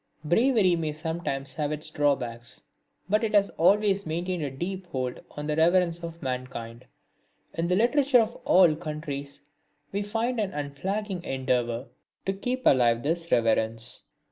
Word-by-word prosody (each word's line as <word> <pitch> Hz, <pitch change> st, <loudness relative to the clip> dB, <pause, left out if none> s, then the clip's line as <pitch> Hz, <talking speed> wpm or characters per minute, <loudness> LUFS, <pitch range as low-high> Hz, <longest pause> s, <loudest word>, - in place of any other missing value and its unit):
Bravery 210 Hz, -, +4 dB
may 160 Hz, -2 st, -2 dB
sometimes 155 Hz, -4 st, -3 dB
have 150 Hz, -1 st, -2 dB
its 150 Hz, +1 st, -3 dB
drawbacks; 125 Hz, -6 st, -1 dB, 0.4 s
but 215 Hz, +4 st, +2 dB
it 215 Hz, -1 st, 0 dB
has 200 Hz, -1 st, +4 dB
always 200 Hz, +3 st, +3 dB
maintained 175 Hz, +2 st, -2 dB
a 145 Hz, -, -1 dB
deep 180 Hz, +7 st, -5 dB
hold 130 Hz, -6 st, -3 dB
on 150 Hz, -, -7 dB
the 150 Hz, 0 st, 0 dB
reverence 170 Hz, +1 st, +3 dB
of 170 Hz, -1 st, -8 dB
mankind. 125 Hz, -2 st, -5 dB, 0.7 s
In 165 Hz, +1 st, -1 dB
the 180 Hz, -, +2 dB
literature 250 Hz, +4 st, +4 dB
of 225 Hz, +1 st, -2 dB
all 180 Hz, -4 st, +5 dB
countries 150 Hz, -4 st, -6 dB, 0.5 s
we 200 Hz, -, -1 dB
find 225 Hz, +4 st, -1 dB
an 205 Hz, -3 st, -1 dB
unflagging 180 Hz, +7 st, -3 dB
endeavour 125 Hz, -3 st, -1 dB, 0.4 s
to 195 Hz, -, 0 dB
keep 250 Hz, +6 st, -3 dB
alive 120 Hz, -3 st, +4 dB
this 170 Hz, +3 st, -2 dB
reverence. 115 Hz, +1 st, +1 dB
165 Hz, 145 wpm, -27 LUFS, 135-195 Hz, 0.7 s, all